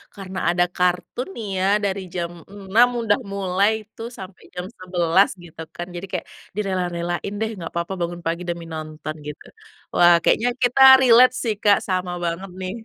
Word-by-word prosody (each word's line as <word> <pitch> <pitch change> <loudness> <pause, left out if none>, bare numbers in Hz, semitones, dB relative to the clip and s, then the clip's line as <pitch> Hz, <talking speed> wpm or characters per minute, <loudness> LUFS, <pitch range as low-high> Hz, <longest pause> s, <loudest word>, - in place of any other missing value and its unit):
karena 190 -1 -6
ada 175 0 +3
kartun 180 +7 -1
nih, 220 - -6
ya, 190 - +1 0.2
dari 195 -1 -1
jam 170 -1 -2 0.2
6.00 205 +4 +3
udah 215 +1 +2
mulai 195 +1 +1 0.2
tuh, 225 +1 -6
sampai 190 0 -10
jam 180 0 -4
11.00, 180 +1 +2
gitu 165 -1 -11
kan. 175 +1 -5
Jadi, 175 - -5
kayak 180 - -3 0.3
direla-relain 180 -2 -2
deh, 220 - 0
"Enggak 170 -4 -7
apa-apa 170 +2 -3
bangun 175 0 -3
pagi 170 +2 -2
demi 170 -1 -4
nonton," 155 0 -6
gitu. 150 - -8 0.5
Wah, 175 0 +7
kayaknya 245 +2 +3
kita 250 +2 +2 0.2
relate 250 0 +7
sih 220 -3 0
Kak, 205 -1 +5
sama 185 -1 -1
banget 180 +3 -4
nih. 185 0 -4
185 Hz, 170 wpm, -22 LUFS, 175-200 Hz, 0.5 s, Wah